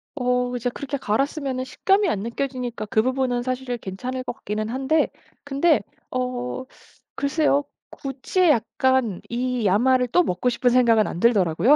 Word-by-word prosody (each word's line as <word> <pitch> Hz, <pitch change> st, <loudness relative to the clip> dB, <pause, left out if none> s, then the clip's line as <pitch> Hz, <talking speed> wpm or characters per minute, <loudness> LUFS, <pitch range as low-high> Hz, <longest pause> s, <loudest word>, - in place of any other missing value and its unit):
어 250 Hz, -2 st, 0 dB
이제 245 Hz, 0 st, -1 dB
그렇게 280 Hz, +3 st, -4 dB
갈았으면은 265 Hz, +3 st, -1 dB
식감이 390 Hz, +9 st, +2 dB
안 205 Hz, -, 0 dB
느껴지니까 245 Hz, 0 st, -3 dB
그 220 Hz, -, +3 dB
부분은 255 Hz, -1 st, 0 dB
사실 255 Hz, -1 st, -3 dB
괜찮을 250 Hz, +6 st, -5 dB
것 -, -, -4 dB
같기는 215 Hz, 0 st, -4 dB
한데 270 Hz, +6 st, +1 dB, 0.3 s
근데 285 Hz, +3 st, +2 dB, 0.3 s
어 250 Hz, 0 st, -3 dB, 0.5 s
글쎄요. 285 Hz, 0 st, +2 dB, 0.3 s
굳이 275 Hz, +6 st, -3 dB
약간 255 Hz, -4 st, +1 dB
이 245 Hz, -1 st, -1 dB
야마를 250 Hz, +6 st, +3 dB
또 355 Hz, -, +4 dB
먹고 185 Hz, -, 0 dB
싶은 245 Hz, +1 st, +2 dB
생각은 235 Hz, -4 st, +4 dB
안 -, -, -5 dB
들더라고요. 210 Hz, -, +4 dB
250 Hz, 320 characters per minute, -23 LUFS, 235-270 Hz, 0.5 s, 또